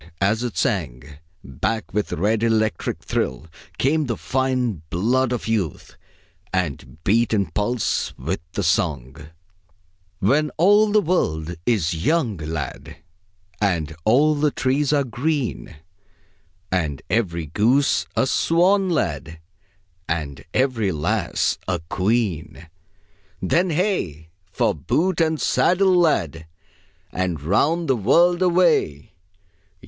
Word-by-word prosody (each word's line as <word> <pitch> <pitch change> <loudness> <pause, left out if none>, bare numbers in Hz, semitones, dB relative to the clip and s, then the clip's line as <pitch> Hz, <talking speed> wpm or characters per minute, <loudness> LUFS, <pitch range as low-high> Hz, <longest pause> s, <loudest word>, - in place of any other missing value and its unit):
And 100 +1 +3
as 110 +1 -2
it 120 -2 -4
sang, 75 -5 -2 0.2
back 85 - -3
with 105 0 -1
red 105 +6 0
electric 110 -4 0
thrill 70 +4 -2 0.3
came 150 +2 +1
the 115 - -2
fine 130 - -1
blood 120 +9 +1
of 120 -2 -3
youth, 105 -9 -2 0.6
and 75 -7 -3
beat 115 +4 +2
in 100 -6 -1
pulse 105 +5 -1
with 80 +9 -3
the 100 - -2
song: 75 -4 -1 0.9
"When 140 +10 +2
all 205 +5 +5
the 210 0 +4
world 85 - -1
is 85 -8 0
young, 135 - +1
lad, 75 -1 -6 0.6
And 85 -6 0
all 145 +8 +4
the 150 0 +1
trees 135 +1 0
are 145 -2 +3
green, 130 - -3 1.0
And 80 -8 -1
every 85 -5 -1
goose 115 - +2
a - - +2
swan, 185 +7 +2
lad, 85 - -2 0.7
And 75 -4 -3
every 125 -7 +1
lass 75 -3 -1
a 95 -2 0
queen. 95 -6 -1 0.7
"Then 175 - +1
hey! 150 - -1 0.2
for - - +1
boot 165 - 0
and 160 -1 +1
saddle, 185 +1 +3
lad, 80 - +1 0.6
And 90 -4 -2
round 145 - +1
the 130 - +3
world 170 - +3
away! 170 - +2
110 Hz, 115 wpm, -22 LUFS, -, 1.0 s, all